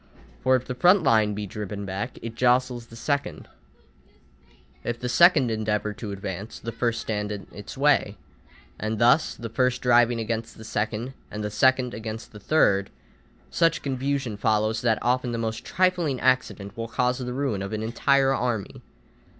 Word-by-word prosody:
For 130 0 +4
if 125 0 -1
the 125 - -4
front 180 +8 +4
line 110 -6 +3
be 105 0 -4
driven 100 0 -6
back, 95 +1 -4
it 115 -1 -5
jostles 125 0 +1
the 115 - -13
second, 140 +4 -2 1.4
if 120 0 -3
the 125 - -3
second 170 +4 +6
line 110 -1 -1
endeavour 105 0 -1
to 105 -1 -7
advance, 100 +2 -6
the 115 - -5
first 115 0 -1
stands 105 -1 -3
in 100 -2 -6
its 105 +5 -9
way: 140 -7 +2 0.6
and 110 +1 -2
thus, 120 +7 +4
the 115 - -6
first 125 +2 +1
driving 120 -1 +4
against 115 0 -3
the 110 - -10
second, 110 +4 -3 0.2
and 105 0 -5
the 105 - -3
second 130 +3 +3
against 110 +1 -6
the 105 - -11
third, 100 -6 +2 0.6
such 165 0 +2
confusion 135 -4 -2
follows 110 +1 +1
that 115 -2 +2
often 125 0 +1
the - - -2
most 110 -1 -3
trifling 180 -7 +1
accident 125 -5 0
will 115 -1 -4
cause 125 +2 0
the 125 -1 -4
ruin 130 -6 -1
of 100 - -5
an 110 0 -3
entire 135 +4 +2
army. 120 -6 -2
115 Hz, 175 wpm, -25 LUFS, 105-130 Hz, 1.4 s, second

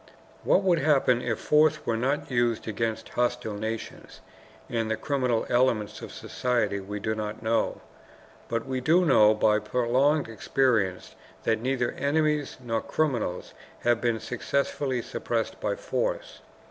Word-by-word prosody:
What 195 - +3
would 175 -3 +3
happen 135 -4 +3
if - - -1
force 155 0 +3
were 115 - 0
not 140 +5 -1
used 120 -2 +1
against 110 +1 -2
hostile 120 -3 -1
nations 110 +2 -6 0.5
and 115 -2 -2
the 110 - 0
criminal 125 -2 0
elements 120 -4 +1
of - - -8
society 115 -5 -1
we 100 +2 -6
do 110 +2 -1
not 110 0 -5
know. 115 +1 0 0.7
But 115 0 -1
we 130 -1 -3
do 170 +7 +4
know 110 -8 +6
by 105 0 +3
prolonged 125 +7 +1
experience 115 -4 0 0.3
that 110 -1 +1
neither 125 -1 0
enemies 150 0 0
nor 115 -3 -2
criminals 120 - -2 0.3
have 120 -1 +2
been 115 -2 +1
successfully 130 0 -2
suppressed - - -3
by - - 0
force. - - -3
120 Hz, 140 wpm, -27 LUFS, 110-140 Hz, 0.7 s, know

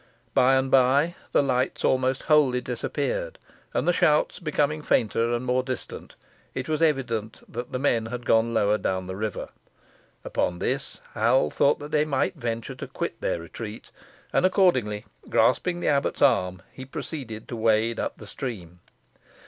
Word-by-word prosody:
By 130 +1 +5
and 130 0 +1
by 135 +6 +4 0.2
the - - +4
lights 130 -1 0
almost 130 0 +1
wholly 145 -5 +4
disappeared, - - -3 0.3
and - - -1
the 175 - +4
shouts 155 -3 +2
becoming 150 -2 0
fainter 115 -3 +1
and 120 +1 -1
more 125 +1 +2
distant, 130 -1 -7 0.4
it 130 0 -3
was 155 0 -1
evident 120 -8 0
that 120 +1 -6
the - - -1
men 120 -4 +1
had 120 +1 -6
gone 115 +1 +3
lower 105 -2 +2
down 95 -1 -1
the 95 0 -5
river. 105 0 -4 0.7
Upon 90 - -1
this, - - -3
Hal 75 - +3
thought 145 +1 +1
they 150 0 +3
might 145 +5 0
venture 115 -7 -4
to - - -7
quit - - -5
their - - -1
retreat, 105 +6 -8 0.4
and - - +3
accordingly, 130 - +2 0.2
grasping 175 -1 +2
the - - +1
abbot's 140 -1 +1
arm, 90 0 +2
he 130 - -9
proceeded 130 -5 -7
to 120 - -4
wade 110 0 +2
up - - -3
the 110 - -11
stream. 100 -7 -7
125 Hz, 160 wpm, -26 LUFS, 110-145 Hz, 0.7 s, By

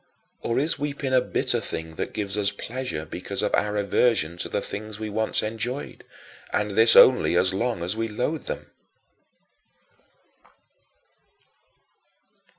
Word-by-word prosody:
Or 115 - -1
is 155 +4 +1
weeping 140 -2 -3
a 130 - +5
bitter - - 0
thing 80 0 -5
that - - -4
gives 100 -2 -3
us 100 -2 +2
pleasure 115 -6 -5
because 95 +6 -5
of 105 - -1
our 105 0 +1
aversion 100 -4 +2
to - - -5
the - - -1
things 105 +1 -6
we 110 -1 -4
once 110 +1 0
enjoyed 115 +5 -4 0.5
and 105 0 0
this 110 +3 +5
only 125 -8 +7
as 95 +1 +3
long 100 -3 -1
as 90 +4 -2
we 115 0 -1
loathe 125 +8 -2
them? - - -6
110 Hz, 140 wpm, -25 LUFS, 100-125 Hz, 0.5 s, only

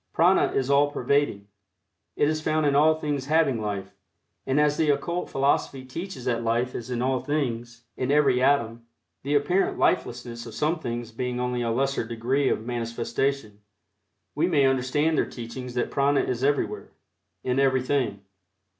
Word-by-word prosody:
Prana - - +4
is 135 +1 0
all 145 +1 +4
pervading. 140 -8 0 0.7
It 145 - +2
is 155 0 -1
found 155 0 +1
in 140 -1 +2
all 155 +2 +5
things 145 -4 -3
having 150 -7 +2
life, 100 -2 -4 0.5
and 135 +2 +2
as 150 0 +3
the 155 0 +1
occult 170 +5 -1
philosophy 135 -1 0
teaches 150 0 -7
that 115 -2 0
life 120 +2 0
is 120 +1 -6
in 125 -1 -1
all 130 0 +1
things 120 -5 -3
in 130 - -2
every 140 -4 +3
atom 115 -4 +1 0.3
the 145 +2 -1
apparent 175 +7 +1
lifelessness 120 -6 -1
of 110 - -9
some 155 +3 0
things 120 -4 -5
being 125 +2 -3
only 125 0 -1
a 115 - -1
lesser 135 +3 0
degree 120 +4 0
of 110 - -1
manifestation, 115 -1 -2 0.7
we 155 +4 +1
may 150 -6 +3
understand 135 +4 +1
their - - 0
teachings 125 +1 -7
that 125 - -1
prana 140 0 +2
is 125 0 -2
everywhere, 145 +1 0 0.5
in 125 +1 0
everything. 130 -5 +1
130 Hz, 165 wpm, -25 LUFS, 120-145 Hz, 0.7 s, all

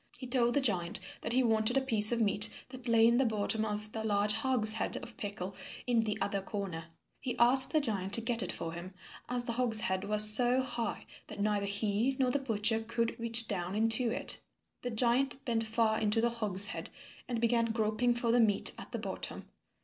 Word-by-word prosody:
He 255 - -10
told 245 -1 -1
the 285 - +1
giant 185 -8 0 0.2
that - - -6
he 255 +1 +1
wanted 225 +2 +1
a - - +1
piece 220 -5 +7
of 235 - -1
meat 210 -1 +3 0.2
that 255 -1 -11
lay 230 -1 +3
in 235 +1 +2
the 265 - +2
bottom 220 -1 -2
of 210 0 -5
the 220 0 -6
large 205 -1 +2
hogshead 225 -5 +1
of 230 - -10
pickle 195 -2 -7 0.3
in 235 -2 0
the 210 -1 -4
other 200 -1 -3
corner. 190 -5 -7 0.3
He 255 -3 -6
asked 255 +3 +5
the 310 - +1
giant 200 -7 -4
to 230 - +2
get 230 +1 0
it - - 0
for 165 0 -7
him, 180 +2 -10 0.3
as 245 0 0
the 240 - -5
hogshead 220 -6 -1
was 210 +1 +7
so 245 +4 +6
high 240 -4 -5 0.2
that - - -11
neither 205 -1 -2
he 210 +5 -2
nor 255 -2 0
the 285 - -1
butcher 225 -3 +1
could 230 +1 -4
reach 230 0 +1
down 180 -1 -5
into 225 +2 +2
it. 230 - -1 0.4
The 245 - -5
giant 245 +3 -1
bent 225 -2 -2
far 220 -1 0
into 215 +1 0
the 235 +1 0
hogshead 210 -2 +2 0.4
and 240 -2 -4
began 230 0 0
groping 225 +1 -2
for 235 -1 -1
the 245 - +2
meat 210 -4 +2
at - - -12
the - - -3
bottom. - - -4
225 Hz, 205 wpm, -30 LUFS, 210-240 Hz, 0.4 s, piece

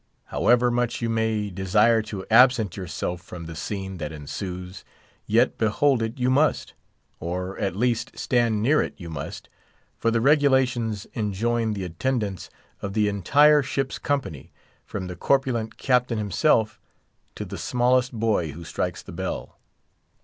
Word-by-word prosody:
However 120 +1 +3
much 120 0 -1
you 115 - 0
may 110 -2 0
desire 105 +5 +3
to 105 -3 -7
absent 120 -4 +5
yourself 90 -1 -4
from 85 -1 -9
the 80 0 -8
scene 95 +3 -5
that 75 -3 -5
ensues, 90 +5 -7 0.4
yet 115 +4 +2
behold 125 +4 +2
it 115 0 -3
you 125 0 +1
must; 150 +4 +1 0.5
or, 90 +3 -4
at 95 -3 -1
least, 120 +2 -1
stand 115 -4 +1
near 150 +6 +4
it - - -4
you 85 -3 -8
must; 70 -3 -6 0.5
for 115 - +2
the 115 0 +1
regulations 130 -6 +2
enjoin 110 +1 -1
the 100 -2 -4
attendance 100 +2 -2 0.3
of 100 -1 -4
the 105 0 +2
entire 145 - +5
ship's 135 0 -3
company, 130 - -3 0.4
from 95 -2 -5
the 90 0 -6
corpulent 120 0 0
Captain 125 -2 +1
himself 110 - +1 0.5
to - - -5
the - - -7
smallest 125 +1 +2
boy 110 - 0
who 85 +3 -9
strikes 80 - -3
the - - -10
bell. 95 +2 -5
110 Hz, 150 wpm, -24 LUFS, 95-125 Hz, 0.5 s, absent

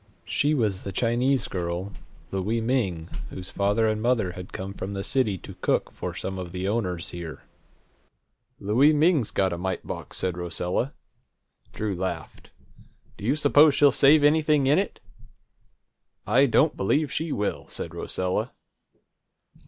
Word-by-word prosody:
She 150 +2 +1
was 105 -8 0
the 100 - -5
Chinese 125 +6 +1
girl, 90 +2 -3 0.4
Louie 100 +4 -1
Ming, 110 -9 -1 0.2
whose 90 0 -7
father 105 +3 +1
and 110 0 0
mother 115 -6 +1
had 90 0 -9
come 95 +1 -6
from 100 0 -5
the 100 0 -3
city 110 -7 0
to - - -10
cook - - -1
for - - -6
some 95 0 -4
of 90 -1 -7
the 95 +1 -3
owners 95 -6 -1
here. 85 -5 -7 1.2
"Louie 125 +10 +4
Ming's 150 - +3
got 95 -2 +1
a 85 - -5
mite 95 +1 -3
box!" - - -7
said 90 -1 -2
Rosella. 90 - -2 0.8
Drew 105 -2 -3
laughed. 85 -3 -5 0.7
"Do - - -12
you 125 +7 +2
suppose 145 0 +5
she'll 145 -1 +6
save 145 +2 +5
anything 150 -1 +4
in 145 +6 +4
it?" 200 - -3 1.3
"I 130 +7 +4
don't 145 +5 +3
believe 140 +9 +1
she 160 0 -2
will," 105 -5 -2
said - - -5
Rosella. 90 0 -2
105 Hz, 150 wpm, -26 LUFS, 95-135 Hz, 1.3 s, she'll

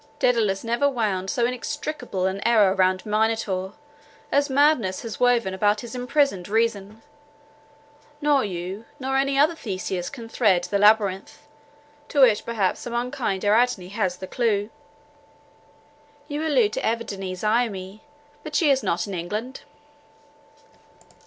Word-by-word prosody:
Daedalus 230 -8 +1
never 235 +5 +1
wound 205 -7 -1
so 240 +3 +1
inextricable 250 -4 -3
an 190 +1 -2
error 215 -5 +4
round 185 -1 +1
Minotaur, 210 -3 -1 0.6
as 285 +1 +2
madness 265 -9 +2
has 230 -2 -6
woven 240 -6 +2
about 205 +2 +1
his 240 - -9
imprisoned 250 -6 0
reason. 220 -1 -1 1.2
Nor 290 -2 +2
you, 190 +3 -5
nor 265 0 -2
any 275 0 +1
other 300 +4 +4
Theseus, 185 - -4
can 235 -4 -9
thread 205 -6 +2
the 200 - -1
labyrinth, 205 +2 +2 0.7
to 285 - +2
which 220 -5 +5
perhaps 210 -5 0
some 240 -1 -6
unkind 240 -6 -2
Ariadne 210 -3 +2
has 190 -3 -2
the 190 - -7
clue." 210 0 -1 1.6
"You 300 +1 -3
allude 245 -8 +2
to - - -2
Evadne 200 -5 -3
Zaimi: 210 -1 -1 0.4
but 305 -1 -7
she 300 -3 +4
is 270 -1 +2
not 180 -5 -1
in 200 - -7
England." 210 +9 -5
220 Hz, 135 wpm, -24 LUFS, 195-250 Hz, 1.6 s, which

